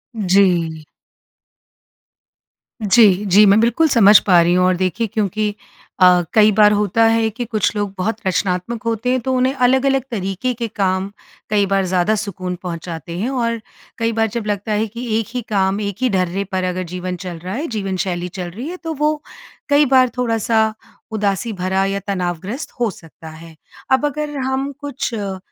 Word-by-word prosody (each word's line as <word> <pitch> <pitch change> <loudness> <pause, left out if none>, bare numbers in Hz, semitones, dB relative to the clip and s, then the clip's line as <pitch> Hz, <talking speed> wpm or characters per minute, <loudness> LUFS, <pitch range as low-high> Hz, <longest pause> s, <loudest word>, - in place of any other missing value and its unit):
जी। 180 -6 +2 2.0
जी, 205 -2 +5
जी 200 +2 +6
मैं 200 +1 +5
बिल्कुल 240 +8 +3
समझ 215 -5 +7
पा 180 -3 +6
रही 170 +1 +2
हूँ 180 0 +3
और 185 0 +3
देखिए 185 +5 -1
क्योंकि 210 0 -1 0.4
अ, 180 -1 +6
कई 215 -1 +6
बार 210 0 +5
होता 210 +1 +2
है 225 0 +3
कि 240 +3 -5
कुछ 220 -2 -1
लोग 205 -2 -2
बहुत 215 +4 -1
रचनात्मक 185 +4 -1
होते 230 +1 -1
हैं 255 - +1
तो 260 +2 -2
उन्हें 255 +1 +2
अलग-अलग 265 +1 +2
तरीके 195 +4 -2
के 235 -1 -4
काम, 195 -2 -1 0.4
कई 205 -1 +2
बार 195 0 +1
ज़्यादा 185 +3 +1
सुकून 185 -4 -4
पहुँचाते 170 -1 -6
हैं 225 +6 -1
और, 230 -3 -1 0.4
कई 230 0 0
बार 225 0 +1
जब 235 -3 -2
लगता 205 +1 -2
है 210 +1 +1
कि 235 +4 -7
एक 225 - -4
ही 250 - -1
काम 195 -1 +1
एक 200 -1 -3
ही 255 - +2
डर्रे 190 -1 0
पर 185 -1 -1
अगर 185 0 -2
जीवन 180 0 -4
चल 175 -2 -6
रहा 180 +3 -6
है, 280 +8 -3
जीवनशैली 190 -5 -3
चल 180 -1 -6
रही 235 - -7
है, 360 - -6
तो 325 -3 -5
वो 300 +1 0 0.5
कई 290 +1 +5
बार 255 -1 +5
थोड़ा-सा 225 -2 +1 0.4
उदासी 210 +1 -1
भरा 190 0 0
या 195 0 -1
तनावग्रस्त 185 - -3
हो 235 -2 +1
सकता 165 -2 -13
है। 160 +1 -13 0.4
अब 265 +3 +3
अगर 295 0 -3
हम 265 +1 -2
कुछ 285 -4 -4
अ, 200 -3 -4
205 Hz, 180 wpm, -19 LUFS, 185-235 Hz, 2.0 s, समझ